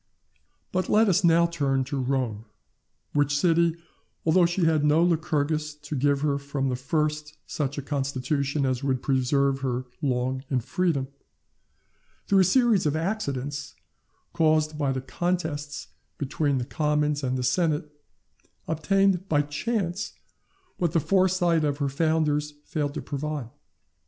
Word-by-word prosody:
But 185 0 -1
let 220 +1 +5
us 190 0 +3
now 170 0 +5
turn 140 -6 0
to 135 +1 -3
Rome, 125 -5 -1 0.7
which 145 0 +2
city, 170 +1 +3 0.5
although 170 +2 +5
she 175 0 0
had 160 -2 +3
no 150 +3 +4
Lycurgus 155 -2 0
to 150 0 -7
give 140 +1 +1
her 145 -1 +1
from 140 -1 -2
the 125 - -1
first 150 +3 -2
such 140 -1 -3
a 140 - -3
constitution 140 0 -1
as 130 0 -1
would 130 -2 0
preserve 135 +1 +1
her 130 -1 -2 0.2
long 130 -1 -1
in 130 - +1
freedom, 140 +1 0 1.2
through 195 - +4
a - - +7
series 230 -4 +3
of 150 - 0
accidents, 145 - -3 0.6
caused 155 -1 +2
by 145 -3 0
the 130 0 -2
contests 155 -2 -3 0.3
between 140 0 0
the 125 - -2
commons 150 0 0
and 130 0 0
the 125 - -2
senate, 155 0 0 0.8
obtained 190 +4 +1
by 145 -1 +3
chance 195 +5 -2 0.6
what 170 -4 0
the 165 - +4
foresight 180 -2 +2
of 145 -1 0
her 140 -1 -1
founders 150 0 0
failed 145 -2 -2
to - - -4
provide. 145 -4 -4
150 Hz, 140 wpm, -26 LUFS, 140-165 Hz, 1.2 s, a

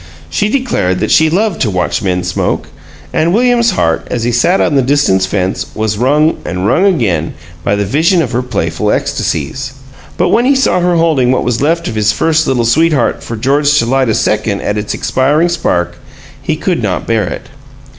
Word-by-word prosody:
She 205 - 0
declared 215 - 0
that - - -1
she 160 0 +4
loved 195 +2 0
to 110 - +1
watch 90 0 -1
men 90 -3 -1
smoke, 90 0 -2 0.4
and 165 +2 +1
William's 240 0 +3
heart, 80 - 0
as 120 - -2
he 120 - 0
sat 170 +11 +2
on - - +1
the 140 - +3
distant 130 -8 +2
fence, 95 -1 -2
was 110 -1 -2
wrung 150 +6 +2
and 90 +2 -3
wrung 145 - +2
again 105 - 0 0.3
by 100 - +1
the 100 0 -1
vision 165 - +2
of 125 - -4
her 125 +1 0
playful 125 -5 -2
ecstasies. 130 - -2 0.4
But 180 - +1
when 240 - +2
he 275 +2 +3
saw 265 -8 +2
her 175 0 +1
holding 155 -7 +2
what 130 - +1
was 120 0 -1
left 165 +3 0
of - - -3
the 110 - -2
first 160 +9 +1
Little 125 -3 +1
Sweetheart 150 +2 +1
for 115 - -5
George 145 +5 +2
to 115 - +2
light 130 0 +1
a 110 - +1
second 105 -1 0
at 105 - -2
its 105 0 -3
expiring 150 +6 +1
spark, 90 - -1 0.4
he 150 +3 -1
could 170 -1 -2
not 100 -5 -2
bear 115 -3 0
it. 85 - -6
130 Hz, 200 wpm, -13 LUFS, 105-165 Hz, 0.4 s, she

